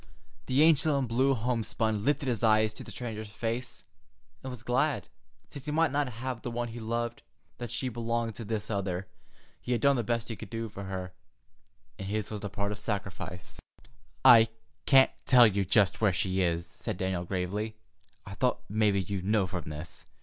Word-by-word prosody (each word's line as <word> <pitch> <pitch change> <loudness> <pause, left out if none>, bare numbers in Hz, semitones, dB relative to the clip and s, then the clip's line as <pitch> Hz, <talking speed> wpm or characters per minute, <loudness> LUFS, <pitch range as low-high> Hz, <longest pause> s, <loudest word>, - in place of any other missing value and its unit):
The 135 +4 +4
angel 155 -2 +5
in 135 - +1
blue 130 +4 +2
homespun 110 -3 -1
lifted 145 +2 +1
his 120 -4 0
eyes 110 -1 +4
to - - -9
the - - -11
stranger's 110 -3 -6
face, 115 +3 -4 0.6
and 130 - -6
was 125 -3 -8
glad, 125 +1 0 0.4
since 140 - -10
he - - -4
might 160 -1 +3
not 145 -1 +1
have 120 +1 -4
the - - -4
one 120 0 -3
he 115 +1 -7
loved, 115 +1 -2 0.4
that 120 -1 -5
she 125 +3 -2
belonged 115 -1 -2
to 115 - -7
this 110 0 -3
other. 95 -2 -2 0.6
He 125 - -1
had 115 - 0
done 140 0 +4
the 120 - 0
best 115 +1 -1
he 115 - -3
could 110 -2 -9
do 115 +1 -4
for 100 -1 -7
her, 95 -1 -5 0.9
and 95 - -5
his 105 +1 -2
was 105 -2 -4
the 105 - -4
part 100 +1 -2
of 105 - -5
sacrifice. 100 -4 -5 0.7
"I 115 -2 +9 0.4
can't 135 -1 +7 0.2
tell 125 -2 +8
you 100 -2 +2
just 100 +2 +3
where 105 -3 +4
she 95 +1 0
is," 85 -1 0
said - - -6
Daniel 95 -2 -1
gravely. 100 +4 -2 0.5
"I 100 - -8
thought 125 +5 0
mebbe 100 -3 +1
you'd 100 -3 -3
know 105 0 +2
from 90 -3 -5
this. 75 +3 -8
110 Hz, 195 wpm, -29 LUFS, 100-120 Hz, 0.9 s, I